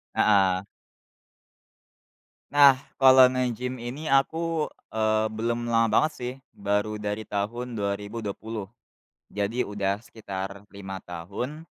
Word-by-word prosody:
Heeh. 95 -2 +3 1.9
Nah, 140 -2 +8 0.2
kalau 130 -1 +9
nge-gym 125 -1 -1
ini 130 +6 -6
aku, 160 +3 +1 0.2
eee, 110 0 +2
belum 120 +2 -1
lama 115 -1 +3
banget, 155 +7 +3
sih, 125 0 -5 0.2
baru 105 +1 -1
dari 105 +1 -3
tahun 120 +5 -3
2020. 105 0 -4 0.6
Jadi 105 +5 -1
udah 100 0 -1
sekitar 100 -3 -7
5 95 -1 -7
tahun, 105 - -6
110 Hz, 100 wpm, -26 LUFS, 100-125 Hz, 1.9 s, kalau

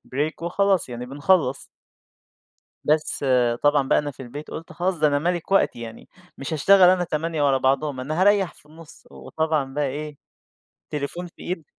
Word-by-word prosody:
break 155 +3 -2
وخلاص 190 -3 +1
يعني 120 0 -6
بنخلّص. 140 0 +1 1.2
بس 150 -1 0 0.4
طبعًا 145 -2 +3
بقى - - +4
أنا 145 -1 -4
في 130 0 -11
البيت، 145 +5 -9
قُلت 165 - -8
خلاص 180 -1 -1
ده 155 - +4
أنا 145 0 +1
ملِك 175 +3 -2
وقتي 155 -10 +2
يعني 115 -1 -10 0.3
مش 140 +4 -5
هاشتغل 185 +4 +6
أنا 185 -1 +3
8 160 -1 -2
ورا 135 -2 +3
بعضهم، 135 +1 0
أنا 155 +6 -3
هاريّح 200 -3 +3
في - - -20
النُص، 155 +1 -16
وطبعًا 155 -4 -2
بقى 145 -1 0
إيه، 150 +1 -6 0.7
التليفون 150 +5 -4
في - - -17
إيد 175 -3 -4
150 Hz, 170 wpm, -23 LUFS, 140-175 Hz, 1.2 s, هاشتغل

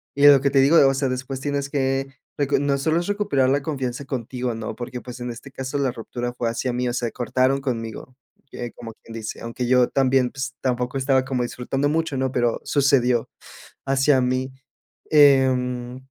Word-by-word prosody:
y 140 +1 +6
lo 140 -2 +8
que 140 - +2
te 135 0 +3
digo, 140 +5 +5
o 135 - +4
sea, 135 0 0
después 130 +1 -4
tienes 140 0 -2
que 135 -1 0 0.3
recon 145 0 +1
no 140 -1 +2
solo 160 +4 +1
es 175 - -4
recuperar 170 -11 +1
la 140 +1 +2
confianza 135 -4 -3
contigo, 125 -2 -4
¿no? 110 -1 -5
Porque, 125 0 -6
pues, 125 0 -9
en 120 - -4
este 120 +4 -10
caso, 130 +1 -4
la 135 -2 +1
ruptura 120 +1 -5
fue 120 -2 -2
hacia 120 +2 -2
mí, 125 0 -1
o - - -3
sea, 120 -1 -1
cortaron 130 +3 0
conmigo, 120 -1 -5 0.4
eh, 120 -1 -6
como 115 -1 -8
quien 115 - -12
dice. 115 -1 -6
Aunque 115 +2 -4
yo 125 0 +4
también, 130 -2 +2
pues, 130 -2 -5
tampoco 125 +1 -1
estaba 130 -1 +2
como 130 -2 -2
disfrutando 135 +3 -2
mucho, 160 -2 -1
¿no? 130 0 0
Pero, 120 -2 +1
sucedió, 135 -4 +2 0.6
hacia 135 0 +3
mí. 130 +1 -1 0.6
Em, 130 -4 +3
130 Hz, 195 wpm, -23 LUFS, 125-140 Hz, 0.6 s, lo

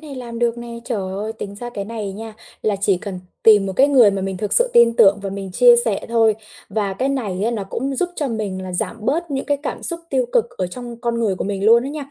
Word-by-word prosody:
này 300 -3 -9
làm 240 -2 -7
được 235 0 0
nè, 235 0 -8 0.2
trời 235 -3 -2
ơi, 210 +3 -4
tính 200 -2 -7
ra 240 +4 -7
cái 200 - -3
này 215 -2 -5
nha 220 +2 -8 0.3
là 210 -2 +1
chỉ 195 -1 +2
cần 190 -1 -6 0.2
tìm 210 -3 +6
một 190 - -3
cái 275 +2 +5
người 250 -7 +6
mà 195 -1 -3
mình 190 0 -3
thực 210 +3 -3
sự - - +3
tin 235 -1 +5
tưởng 200 -1 +6
và 195 - -4
mình 195 -1 -6
chia 245 +4 +7
sẻ 210 -4 -1
thôi 225 -2 +3 0.3
và 200 -1 -1
cái 260 +7 -1
này 210 -9 -2
á, 230 - +1
nó 220 -4 -3
cũng 265 +8 -3
giúp 355 - 0
cho 290 - -1
mình 210 -5 -3
là 185 -1 -6
giảm 180 +5 -2
bớt 320 +9 -1
những 270 -1 -2
cái 285 - +1
cảm - - -4
xúc 340 -1 -4
tiêu 260 -2 +1
cực - - +4
ở 185 - 0
trong 235 +4 -8
con 235 -1 -1
người 210 -4 +1
của - - -3
mình 195 0 -3
luôn 230 +2 +6
á - - -3
nha. 290 -2 -7
225 Hz, 280 wpm, -20 LUFS, 200-245 Hz, 0.3 s, chia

